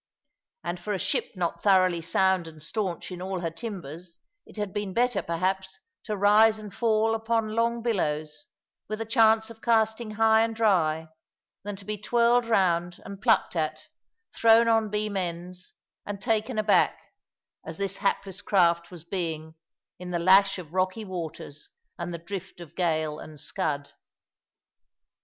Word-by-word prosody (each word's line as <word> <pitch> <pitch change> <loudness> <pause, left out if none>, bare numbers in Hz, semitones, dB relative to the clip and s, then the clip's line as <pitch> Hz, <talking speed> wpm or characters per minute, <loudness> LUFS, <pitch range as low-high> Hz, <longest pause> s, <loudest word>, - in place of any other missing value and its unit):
And 175 +1 -4
for 210 +4 -3
a - - 0
ship - - -1
not 175 -2 -2
thoroughly 185 -4 +4
sound 185 +1 +2
and 155 -1 -12
stanch 185 0 -3
in 180 -1 -7
all 185 -1 -3
her 165 -2 -2
timbers 170 - -8 0.3
it - - -15
had 205 -2 -3
been 205 -2 -3
better, 245 -4 +2
perhaps, 190 +3 -2 0.3
to 210 -2 -3
rise 215 +2 +5
and 210 -2 -9
fall 225 -1 +2
upon 225 0 0
long 230 +1 0
billows, 155 - -2 0.4
with 215 0 -3
a 225 - -3
chance 225 -1 +3
of 225 -1 -14
casting 220 -1 +1
high 220 0 +5
and 225 0 0
dry, 160 -8 +2 0.5
than 205 0 -5
to 195 0 -12
be 210 0 -4
twirled 235 +2 +3
round 175 -5 +1
and 200 0 -9
plucked - - +2
at, 155 -1 -1 0.5
thrown 230 0 +5
on 225 -2 +3
beam 210 0 -2
ends, 180 0 -4 0.3
and 205 -1 -6
taken 220 +3 -1
aback, 215 -1 +3 0.6
as - - -7
this 195 -1 -3
hapless 195 -1 -1
craft 170 -4 +2
was 175 -4 -9
being, 165 -3 -4 0.5
in 180 0 -7
the 175 - -1
lash 190 +3 +5
of 170 -3 -10
rocky 185 +4 0
waters 165 -5 -7 0.3
and 175 +1 -4
the 170 - -4
drift 190 +2 -8
of 170 -1 -11
gale 155 -4 0
and 155 -1 -11
scud. 145 -6 -3
195 Hz, 160 wpm, -27 LUFS, 170-220 Hz, 0.6 s, rise